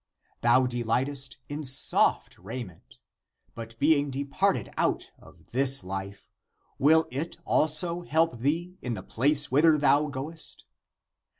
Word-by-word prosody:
Thou 125 +2 +4
de 120 -1 -3
lightest 135 +4 -2
in 150 +1 -6
soft 130 -1 +2
raiment; 95 - -9 0.6
but 115 0 -10
being 145 +1 +2
departed 140 +1 -1
out - - -1
of - - -19
this 135 +1 +2
life, 95 +1 -7 0.5
will 160 +3 +4
it 150 +6 -5
also 170 +3 +3
help 165 -5 0
thee 170 +8 -2
in 125 -2 -4
the 95 - -8
place 145 +4 +2
whither 155 +3 +4
thou 145 +1 +3
goest? 150 +4 -6
140 Hz, 125 wpm, -27 LUFS, 120-155 Hz, 0.6 s, Thou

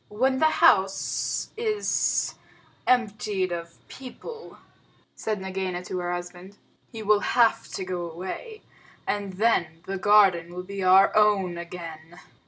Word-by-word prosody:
"When 260 +5 +1
the 315 - +5 0.2
house 195 -10 +2
is 435 -2 0 0.5
emptied 210 -6 +1
of 170 -1 -7
people," 450 - -10 0.6
said 215 -2 -3
Nagaina 190 -1 -4
to 185 - -4
her 175 0 -2
husband, 175 +2 -7 0.3
"he 225 -3 -7
will 210 0 +4
have 230 0 +2
to 190 - -4
go 175 -2 -4
away, 190 - -7 0.4
and 200 -2 -2
then 180 -6 0
the 195 0 -4
garden 185 -5 +4
will 180 - -5
be 195 +1 -6
our 190 +1 +5
own 200 -5 +3
again. 170 -1 -9
190 Hz, 130 wpm, -26 LUFS, 175-215 Hz, 0.6 s, the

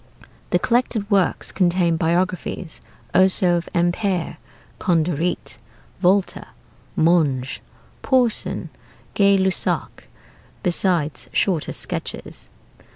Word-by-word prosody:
The - - +3
collected 235 -3 0
works 195 -4 +1
contain 175 -2 +2
biographies 175 +1 -1 0.3
also 185 -1 +4
of 170 - -5
Ampère, 175 +1 0 0.4
Condoreet, 170 -1 0 0.4
Volta, 190 +1 +1 0.5
Monge, 150 -6 +2 0.4
Porson, 250 -4 0 0.4
Gay 200 -1 +4
Lussac, 190 0 -1 0.6
besides 170 -6 0
shorter 175 -6 +1
sketches. - - -5
180 Hz, 80 wpm, -22 LUFS, 170-195 Hz, 0.6 s, also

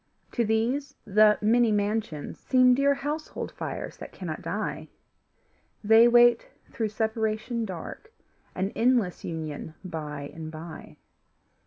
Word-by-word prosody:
To 240 - 0
these 245 +6 0
the 210 +1 +5
many 230 +2 +4
mansions 205 -7 -2
seem 255 -1 +4
Dear 280 +2 +3
household 295 +3 -4
fires - - -6
that - - -9
cannot - - -6
die; - - -4 1.0
They 225 +3 +7
wait 240 0 +5 0.2
through 225 -4 -2
separation 220 +1 -1
dark 190 - -8 0.4
An 190 +2 -1
endless 235 -6 +1
union 160 -1 -5
by 150 -4 -6
and 160 -1 -7
by. 160 +1 -10
220 Hz, 120 wpm, -27 LUFS, 180-240 Hz, 1.0 s, They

